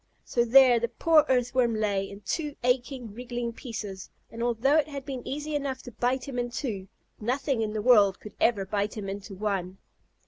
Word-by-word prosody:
So 240 - +1
there 245 0 +7
the 235 - 0
poor 315 +3 +4
Earthworm 245 -2 +2
lay, 200 -2 0
in 200 +1 -10
two 295 - -3
aching, 250 -2 -1
wriggling 240 0 -4
pieces, 215 -6 -7 0.2
and 230 - -7
although 240 +5 +2
it 310 - +2
had 280 -3 -7
been 265 -3 -5
easy 300 +2 -4
enough 275 -3 -2
to 245 - -9
bite 250 +3 -1
him 255 -3 -3
in 245 0 -1
two, 220 -7 -4 0.3
nothing 255 +2 -1
in 215 -1 -2
the 215 -1 -2
world 205 -6 +5
could 210 - -11
ever 210 -5 +3
bite 205 +2 -2
him 200 -2 -4
into 195 +1 -6
one. 190 -2 -2
240 Hz, 195 wpm, -27 LUFS, 210-260 Hz, 0.3 s, there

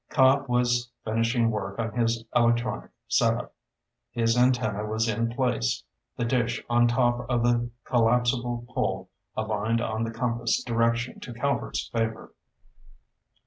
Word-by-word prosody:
Cobb 135 +1 +4
was 120 -1 +1 0.2
finishing 115 +1 +1
work 100 -2 -4
on 115 -1 -2
his 115 -1 0
electronic 120 0 +1 0.2
setup. - - +1 0.6
His 115 0 +1
antenna 125 -4 +2
was 110 +2 -1
in 115 +1 0
place, 120 -1 0 0.3
the 120 - 0
dish 120 -1 0
on 120 0 +4
top 120 0 +1
of 120 -2 +1
the 120 0 +2 0.2
collapsible 120 0 +1
pole 125 - -2 0.3
aligned 110 +1 0
on 110 -1 -2
the 115 - -2
compass 115 0 -1
direction 115 0 0
to 120 -3 -8
Calvert's 140 +4 -1
Favor. 115 -1 -3
120 Hz, 130 wpm, -26 LUFS, 115-120 Hz, 0.6 s, Cobb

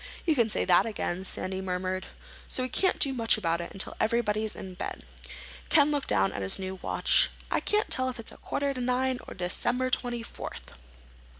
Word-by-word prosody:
"You 330 - +4
can 235 -6 +2
say - - +1
that 180 +4 +5
again," 190 -4 -3
Sandy 190 0 -3
murmured. 185 0 -2 0.4
"So 255 - -2
we 255 - -2
can't 375 +8 +2
do 275 -3 +5
much 230 -4 +3
about 170 -4 0
it 170 - -7
until 195 - -1
everybody's 220 -1 +1
in 190 -1 -7
bed." 180 - -6 0.7
Ken 295 -1 +5
looked 290 -2 -1
down 95 0 +2
at - - -4
his 95 0 +1
new 190 0 -5
watch. - - +4 0.2
"I - - +2
can't 425 +1 0
tell 255 0 +2
if 250 -1 -7
it's 230 - -4
quarter 280 0 -1
to 255 - -5
nine 255 +1 +1
or - - -8
December 245 +8 0
twenty 240 -2 -1
fourth." - - -8
225 Hz, 195 wpm, -28 LUFS, 185-255 Hz, 0.7 s, that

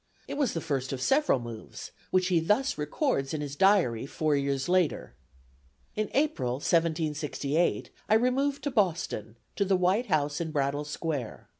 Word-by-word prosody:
It - - -5
was 280 -2 0
the 165 - -2
first 135 -5 -2
of 135 - -3
several 270 - +3
moves, 115 -2 -8 0.2
which 185 0 +2
he 175 -2 +3
thus 210 +12 +1
records 150 - -1
in 150 - -3
his 145 -1 -5
diary 165 - +3
four 155 +1 0
years 140 -1 -1
later: 180 -3 +1 0.8
"In 215 0 -1
April, 280 - +1
1768, 155 0 0 0.2
I - - +5
removed 270 +4 +1
to 285 - -1
Boston, 170 - -1 0.2
to 200 - +1
the 195 -1 +2
white 190 +7 +2
house 150 0 0
in 165 - -2
Brattle 145 0 -1
Square. 150 -5 -4
160 Hz, 160 wpm, -28 LUFS, 140-205 Hz, 0.8 s, I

